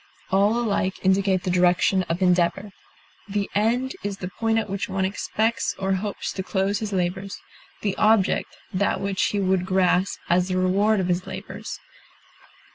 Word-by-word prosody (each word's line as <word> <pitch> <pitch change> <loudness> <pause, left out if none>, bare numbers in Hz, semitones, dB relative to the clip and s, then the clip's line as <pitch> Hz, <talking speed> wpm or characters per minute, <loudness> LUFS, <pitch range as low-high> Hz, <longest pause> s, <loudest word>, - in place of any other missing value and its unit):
All 200 +4 +3
alike 200 -5 0
indicate 190 -1 +2
the 180 - -1
direction 180 +1 +3
of 170 +3 0
endeavor. 180 +3 +2 0.6
The 200 0 -1
end 240 +5 +1
is 200 -1 -4
the 180 - -5
point 225 +2 0
at 220 - 0
which 195 0 -3
one 190 0 0
expects 220 +3 -1
or 195 0 0
hopes 200 +2 -3
to 190 - -3
close 195 +2 0
his 215 -2 -4
labors; 190 +1 -2 0.5
the 200 -2 0
object, 215 -3 +2 0.2
that 200 +2 +1
which 195 -1 0
he 205 - 0
would 190 -2 +1
grasp 185 0 +2
as 180 +1 +2
the 185 -1 -1
reward 200 +3 +2
of 185 - 0
his 180 0 -1
labors. - - -7
195 Hz, 165 wpm, -24 LUFS, 185-205 Hz, 0.6 s, All